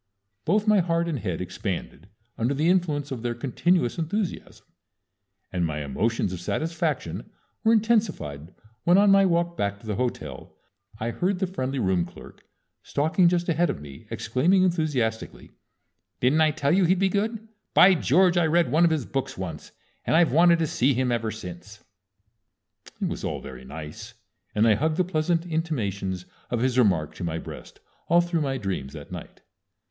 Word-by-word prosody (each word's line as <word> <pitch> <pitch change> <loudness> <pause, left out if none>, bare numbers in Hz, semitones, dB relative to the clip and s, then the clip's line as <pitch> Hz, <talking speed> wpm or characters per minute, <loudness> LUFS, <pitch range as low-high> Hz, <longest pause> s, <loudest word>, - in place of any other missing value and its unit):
Both 205 +5 +2
my 210 -1 +5
heart 170 -1 +1
and 155 -6 -2
head 90 -5 -3
expanded 90 -1 -5 0.3
under 120 +5 0
the 155 +4 +1
influence 155 -6 +1
of 125 -4 -4
their 120 0 -2
continuous 140 +4 0
enthusiasm, 180 +4 -3 0.9
and 90 -1 0
my 75 -2 -2
emotions 100 - -1
of 90 - -6
satisfaction 160 - -2 0.3
were 220 - +4
intensified 205 - 0 0.3
when 175 +2 +5
on 200 0 +6
my 195 0 +6
walk 170 0 +1
back 100 -6 -2
to 110 - -16
the 105 -2 -3
hotel 125 0 -4 0.4
I 115 +2 -2
heard 185 +8 0
the 190 - 0
friendly 135 -7 -3
room 95 -7 +1
clerk, - - -14 0.4
stalking 160 +5 +2
just 175 0 0
ahead 170 0 +2
of - - -3
me, 70 -2 -12
exclaiming 165 - +2
enthusiastically: 150 -11 -1 0.7
"Didn't 135 +6 +3
I 155 - +5
tell 145 -2 0
you 185 +2 +4
he'd 185 +3 +3
be 195 +1 +3
good? 215 +3 -2 0.3
By 190 +1 +8
George! 180 +3 +3
I 170 -2 +3
read 170 +1 +2
one 165 +3 +5
of - - +4
his 155 -6 -1
books 135 -1 -3
once, 85 -5 -6 0.3
and - - +1
I've 165 0 +4
wanted 170 +2 +5
to 165 - +1
see 135 -2 +1
him 125 0 +1
ever 115 -2 0
since." 105 0 -9 1.2
It - - 0
was - - -5
all - - -2
very 65 0 -10
nice, 80 - -9 0.4
and 110 +2 +4
I 110 - +6
hugged 155 +8 0
the 185 - +3
pleasant 165 -1 0
intimations 100 - -2 0.2
of 120 -2 -1
his 130 0 +1
remark 90 -10 +2
to - - -6
my 80 -1 -2
breast - - -10 0.3
all 170 +1 +5
through 170 -2 -1
my 135 -2 -1
dreams 90 - -4
that 75 -3 -10
night. - - -9
140 Hz, 175 wpm, -25 LUFS, 105-175 Hz, 1.2 s, By